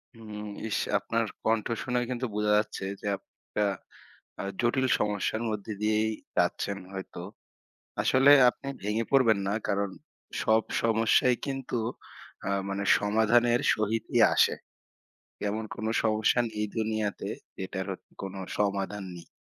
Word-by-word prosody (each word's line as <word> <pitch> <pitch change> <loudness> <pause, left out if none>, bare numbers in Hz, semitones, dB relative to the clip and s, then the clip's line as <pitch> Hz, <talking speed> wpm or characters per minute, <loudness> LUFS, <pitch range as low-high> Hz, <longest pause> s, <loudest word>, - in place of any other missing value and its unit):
হুম, 105 -2 -8 0.2
ইস! - - 0 0.2
আপনার 115 +3 -1 0.2
কন্ঠ 110 -1 +2 0.2
শুনেই 125 -1 0
কিন্তু 125 0 -2
বোঝা 105 0 +1
যাচ্ছে 105 -2 -2 0.2
যে, - - -10
আপ 100 - -13 0.3
অ্যা 105 -1 +3 0.7
আ - - -4 0.2
জটিল 130 +2 +2
সমস্যার 105 +2 0
মধ্য 105 -2 -3 0.2
দিয়েই 110 +1 +2 0.3
যাচ্ছেন 100 +3 +1 0.2
হয়তো। 95 -2 -6 0.8
আসলে 135 +2 +6 0.2
আপনি 140 - -9
ভেঙে 105 +3 0
পড়বেন 115 -6 +5
না। 100 - +1
কারণ 100 0 0 0.5
সব 110 0 +4 0.2
সমস্যাই 115 +2 +4
কিন্তু 135 -3 -3 0.7
আ - - 0 0.2
মানে 100 0 -2
সমাধানের 115 +3 +3
সহিত 110 +1 -1
ই - - +6 0.2
আসে। - - +4 1.0
এমন 110 +2 -2
কোন 110 - -5 0.2
সমস্যা 110 +2 +3
নেই 105 0 -2
দুনিয়াতে 110 -2 -1 0.3
যেটার 95 0 -4
হত 95 - -7 0.2
কোনো 95 0 -5 0.2
সমাধান 100 0 0
নেই। 85 - -11
110 Hz, 135 wpm, -28 LUFS, 100-115 Hz, 1.0 s, আসলে